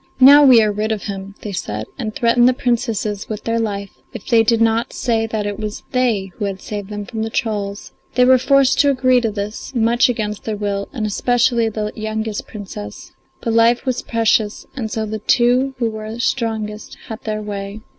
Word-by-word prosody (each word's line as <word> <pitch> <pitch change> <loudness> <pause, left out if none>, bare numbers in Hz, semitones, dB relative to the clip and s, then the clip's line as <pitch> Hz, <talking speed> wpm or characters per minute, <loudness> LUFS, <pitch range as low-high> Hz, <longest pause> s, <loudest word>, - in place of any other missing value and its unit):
"Now 285 +3 +9
we 250 -5 +7
are 210 - +1
rid 210 +2 -2
of 215 -2 -2
him," 195 -1 -6
they 210 - -5
said, 110 - -4
and 220 -5 -5
threatened 240 +1 +4
the - - +2
Princesses 225 -5 -1
with 215 -1 -5
their 230 0 0
life 200 -3 -3 0.2
if - - -8
they 230 -2 +4
did 225 0 +2
not 230 +2 +1
say 225 -3 0
that 215 -2 -3
it 205 0 -4
was 210 -1 -5
they 225 -7 0
who 205 - -2
had 195 -1 -4
saved 205 -1 -6
them 205 -1 -5
from 220 +2 -5
the 220 - -2
trolls. 205 -3 -3 0.2
They 250 0 +5
were 260 0 +6
forced 275 0 +3
to 285 - +5
agree 255 -2 +3
to 230 - 0
this, 210 +5 -6
much 235 +1 +3
against 210 -3 -3
their 215 -2 -2
will, 200 -1 -3
and 230 -6 -3
especially 235 +2 +2
the 210 -1 -3
youngest 220 -1 -4
Princess; 185 - -8 0.3
but 230 - -1
life 230 +1 +3
was 255 -1 -1
precious, 225 -2 0
and 235 -5 -3
so 220 0 -2
the 215 0 -4
two 250 +5 +2
who 230 -3 0
were 220 +1 -6
strongest 220 -3 -2
had 220 0 -7
their 215 -1 -3
way. 200 0 -6
220 Hz, 205 wpm, -19 LUFS, 210-240 Hz, 0.3 s, Now